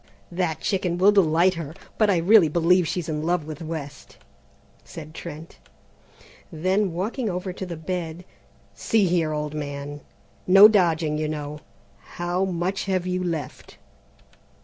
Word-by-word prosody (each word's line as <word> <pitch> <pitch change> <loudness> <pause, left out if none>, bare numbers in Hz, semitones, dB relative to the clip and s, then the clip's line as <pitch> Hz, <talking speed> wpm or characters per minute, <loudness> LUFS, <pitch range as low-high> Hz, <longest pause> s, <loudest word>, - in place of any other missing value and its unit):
"That 175 -3 -2
chicken 185 -3 -1
will 195 +3 +5
delight 180 -2 +3
her, 165 -3 -7 0.2
but 215 -2 +4
I 190 - +3
really 180 +1 +5
believe 170 +2 +3
she's 175 -1 -3
in 150 -2 -3
love 170 0 0
with 155 +1 -8
West," 155 -4 -7 0.7
said 155 -1 -10
Trent. 160 -1 -9 0.9
Then 185 +4 0
walking 215 +7 -3
over 180 0 -4
to 190 0 -6
the 170 -2 -6
bed: 170 +1 -5 0.5
"See 220 -3 +1
here, 170 -3 +1
old 150 0 -3
man, 145 -1 -6 0.5
no 195 +3 +9
dodging, 165 -7 +1
you 155 - -1
know, 150 -1 -5 0.6
how 175 +2 -1
much 185 +1 -2
have 185 -2 -1
you 185 0 -2
left?" 165 -6 -5
170 Hz, 145 wpm, -24 LUFS, 155-185 Hz, 0.9 s, no